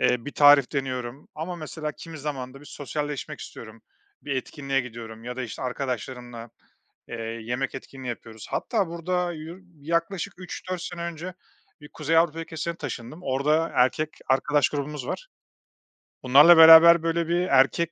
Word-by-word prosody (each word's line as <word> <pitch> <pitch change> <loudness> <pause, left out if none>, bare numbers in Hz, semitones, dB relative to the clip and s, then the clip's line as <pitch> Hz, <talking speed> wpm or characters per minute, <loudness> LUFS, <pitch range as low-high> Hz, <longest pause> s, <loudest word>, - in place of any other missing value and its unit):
eee, 120 -2 +1
bir 145 - -6
tarif 145 -2 +6
deniyorum. 130 -1 -4
Ama, 170 +3 -5
mesela, 155 -1 -5
kimi 165 -2 -10
zaman 135 -3 -5
da 135 - -12
bir 145 - -15
sosyalleşmek 145 0 -5
istiyorum, - - -11 0.4
bir 140 - -3
etkinliğe 135 +1 -2
gidiyorum 115 -2 -9
ya 125 0 -6
da, 130 - -3
işte, 115 - -7
arkadaşlarımla, 125 -2 -5 0.6
eee, 115 - -6 0.3
yemek 125 +3 -3
etkinliği 135 -1 -9
yapıyoruz. 115 -2 -8
Hatta 215 -6 -1
burada 175 +1 -2
yu 160 +3 -9 0.2
yaklaşık 170 +4 -2
3-4 180 0 -6
sene 175 -1 -6
önce 170 +2 -6 0.5
bir 145 - -12
Kuzey 160 +1 -1
Avrupa 165 -1 +2
ülkesine 165 +1 -4
taşındım. 145 +2 -7
Orada 150 +3 +1
erkek 150 +5 +2 0.2
arkadaş 145 +1 +2
grubumuz 145 -2 -5
var. - - -5 1.0
Bunlarla 145 +7 +8
beraber, 165 +1 +9
böyle, 165 0 0
bir 175 +1 +1
erkek, 155 +5 +3
150 Hz, 150 wpm, -25 LUFS, 130-165 Hz, 1.0 s, beraber